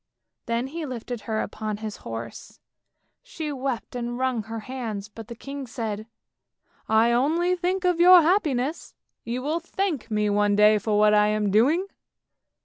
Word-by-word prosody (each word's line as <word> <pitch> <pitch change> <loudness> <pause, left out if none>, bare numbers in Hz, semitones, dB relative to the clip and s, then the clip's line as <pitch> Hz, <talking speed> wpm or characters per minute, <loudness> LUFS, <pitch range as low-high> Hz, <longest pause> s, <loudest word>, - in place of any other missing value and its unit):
" - - -58
Then 235 +1 0
he 320 +5 -6
lifted 245 -4 -5
her 220 0 0
upon 215 -1 -4
his 215 -1 -6
horse, 115 0 -8 0.6
she 320 -12 -6
wept 260 -3 -4
and 240 0 -3
wrung 255 -3 0
her 225 0 -6
hands, 220 -5 -5
but 220 0 -11
the 235 - -8
king 275 +3 -7
said, 220 -3 -5 0.4
" - - -40
I 220 +2 +4
only 325 +9 +2
think 365 +1 -1
of 355 -2 +2
your 355 0 +8
happiness; 310 -5 0 0.3
you 245 +2 -4
will 310 +4 -1
thank 340 - -3
me 210 -1 +1
one 205 0 +2
day 210 +1 +5
for 210 0 0
what 210 0 +5
I 210 0 +5
am 210 -1 0
doing! 280 - +3
240 Hz, 170 wpm, -25 LUFS, 215-305 Hz, 0.6 s, your